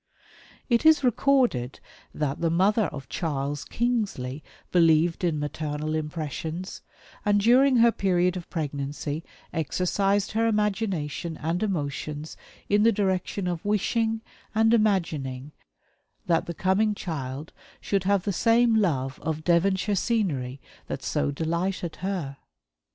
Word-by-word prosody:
It 235 -2 +2
is 315 -2 +6
recorded 245 - +2 0.3
that 145 -2 -2
the 165 - +2
mother 200 +6 +3
of 140 -5 -6
Charles 145 -3 -2
Kingsley 200 - -2 0.3
believed 165 0 +3
in 165 -3 +1
maternal 150 +1 -3
impressions, 155 +3 -4 0.4
and 205 -1 +3
during 255 +5 +5
her 235 0 +6
period 180 -3 +1
of 180 -2 -7
pregnancy 145 0 -3 0.3
exercised 195 +6 0
her 225 +1 +1
imagination 195 -7 -1
and 165 +3 -2
emotions 150 -5 -3 0.3
in 205 +1 +3
the 230 +2 +5
direction 190 -1 -1
of 175 -2 -3
wishing, 220 +2 0 0.3
and 225 +1 +4
imagining, 155 - 0 0.7
that 165 -2 +1
the 170 - -4
coming 205 +4 +2
child 145 -5 -5 0.3
should 195 -2 -1
have 200 -2 +2
the 200 - -1
same 230 +4 +4
love 145 -11 +1
of 155 0 -3
Devonshire 190 +4 +2
scenery 170 - -1 0.3
that - - -5
so - - 0
delighted 170 +3 -2
her. 175 -7 -3
175 Hz, 125 wpm, -26 LUFS, 150-210 Hz, 0.7 s, is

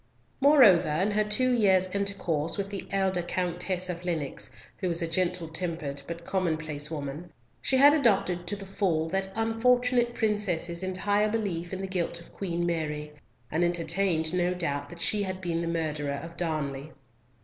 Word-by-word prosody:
Moreover, 260 - +6
in 180 +8 +1
her 215 +1 +2
two 250 +5 +1
years' 190 -5 +3
intercourse 185 -6 -1
with 200 0 -3
the 200 - -5
elder 190 -2 +1
Countess 180 +1 -2
of 175 -1 -5
Lennox, 165 -6 -3 0.3
who 185 - -2
was 170 0 +3
a - - 0
gentle 175 0 0
tempered 160 -4 -3
but 170 0 -6
commonplace 155 -5 -1
woman, 155 +2 -5 0.3
she 265 - +2
had 285 +2 +8
adopted 195 - +2
to 205 - -1
the 195 -1 -8
full 185 -5 0
that 190 +2 -1
unfortunate 240 +2 +2
princess's 190 -6 0
entire 205 +3 +1
belief 190 -6 -2
in 190 0 -4
the 195 - -3
guilt 175 -2 -2
of 170 - -16
Queen 175 -3 -2
Mary, 150 -3 -2 0.4
and 160 +3 +1
entertained 170 -1 0
no 180 0 +1
doubt 145 -4 -2
that 170 -1 -9
she 210 - +1
had 185 -2 -3
been 170 -2 -2
the 170 - -2
murderer 155 -4 -1
of 170 0 -9
Darnley. 155 -4 -2
180 Hz, 170 wpm, -28 LUFS, 165-200 Hz, 0.4 s, had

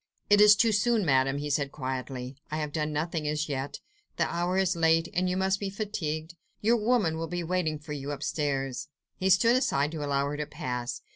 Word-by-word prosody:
"It 205 0 +7
is 210 0 +9
too 225 +1 +3
soon, 220 0 +2
Madame!" 135 -1 +3
he 145 0 -3
said 140 -1 0
quietly; 130 -1 -5
"I 155 - -3
have 150 -1 -3
done 155 0 -1
nothing 155 0 -2
as 150 +1 -1
yet. 140 -1 -4 0.4
The - - +3
hour 175 +2 -1
is 190 -1 +2
late, 165 0 +3
and 180 +1 +1
you 180 - -1
must 190 +1 +1
be 200 - -3
fatigued. 170 -6 -4 0.3
Your 230 +3 +3
women 215 -8 +1
will 165 - -3
be 175 +1 -3
waiting 165 -3 -1
for 150 0 -8
you 140 -1 -5
upstairs." 140 -2 -2 0.3
He 190 - 0
stood 230 +6 +5
aside 150 - +1
to 155 -2 -4
allow 140 -1 0
her 145 +1 -3
to 150 -1 -3
pass. 125 -1 -4
155 Hz, 210 wpm, -28 LUFS, 145-190 Hz, 0.4 s, is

